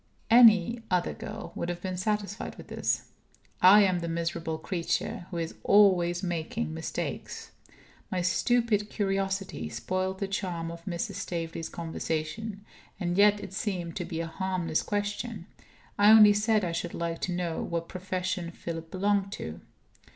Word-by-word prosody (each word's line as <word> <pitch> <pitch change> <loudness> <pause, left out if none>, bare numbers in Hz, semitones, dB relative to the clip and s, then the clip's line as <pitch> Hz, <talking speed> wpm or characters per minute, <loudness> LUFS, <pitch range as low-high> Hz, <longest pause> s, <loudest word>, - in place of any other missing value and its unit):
Any 230 -1 +7
other 180 -2 +1
girl 220 +1 -7
would 170 - -3
have 175 0 -3
been 185 -1 -2
satisfied 205 +2 -2
with - - -12
this. - - -1 0.6
I 200 +3 +9
am 185 -2 +2
the 170 - -4
miserable 165 -1 -2
creature 185 +4 -2
who 175 - -5
is 165 -1 -3
always 185 -3 +4
making 160 - -2
mistakes. 80 - -5 0.6
My 180 -1 0
stupid 215 +2 +2
curiosity 195 - -2
spoiled 185 - -2
the 195 - -2
charm 175 -4 -3
of 170 0 -10
Mrs. 190 +3 -3
Staveley's 165 -4 -4
conversation. 165 +5 -4 0.3
And 175 -2 -1
yet 205 +1 +5
it 195 -2 -8
seemed 180 -5 -3
to 175 - -3
be 165 -1 -3
a - - -3
harmless 175 -1 -1
question; 205 -1 -3 0.5
I 205 +1 +7
only 215 -1 +9
said 210 -1 +2
I 170 - -2
should 170 +1 -3
like 170 0 -3
to 185 - -1
know 175 -2 -2
what 170 0 -3
profession 185 -1 -3
Philip 165 -1 -6
belonged 200 +1 +1
to. 80 +1 -6
185 Hz, 150 wpm, -28 LUFS, 170-205 Hz, 0.6 s, I